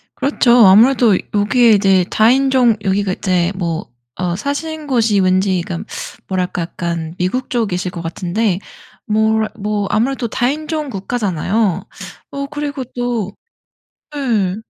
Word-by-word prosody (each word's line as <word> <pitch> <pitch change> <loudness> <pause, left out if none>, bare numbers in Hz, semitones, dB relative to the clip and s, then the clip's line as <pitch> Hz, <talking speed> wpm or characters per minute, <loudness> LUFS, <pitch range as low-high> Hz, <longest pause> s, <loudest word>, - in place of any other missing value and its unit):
그렇죠. 275 -3 +1 0.2
아무래도 225 +1 +5 0.2
여기에 225 +3 +4
이제 195 -3 +4
다인종 255 +1 +3
여기가 195 0 0
이제 180 -2 0
뭐 170 -3 -3 0.3
어 180 -1 -2
사시는 300 - -4
곳이 225 -6 +2
왠지 185 -1 +2
그 170 -2 -5 0.4
뭐랄까 180 -2 -2
약간 170 -1 -4
미국 185 +9 -2
쪽이실 190 -7 -1
것 170 - -6
같은데 180 +4 -1 0.5
뭐 220 +1 +2 0.2
뭐 205 -1 -2
아무래도 245 +2 0
다인종 300 +6 -2
국가잖아요. 200 -2 -1 0.5
어 280 0 -4
그리고 290 -2 -4
또 240 -5 -2 0.8
예. 220 -10 0
210 Hz, 260 characters per minute, -17 LUFS, 185-250 Hz, 0.8 s, 아무래도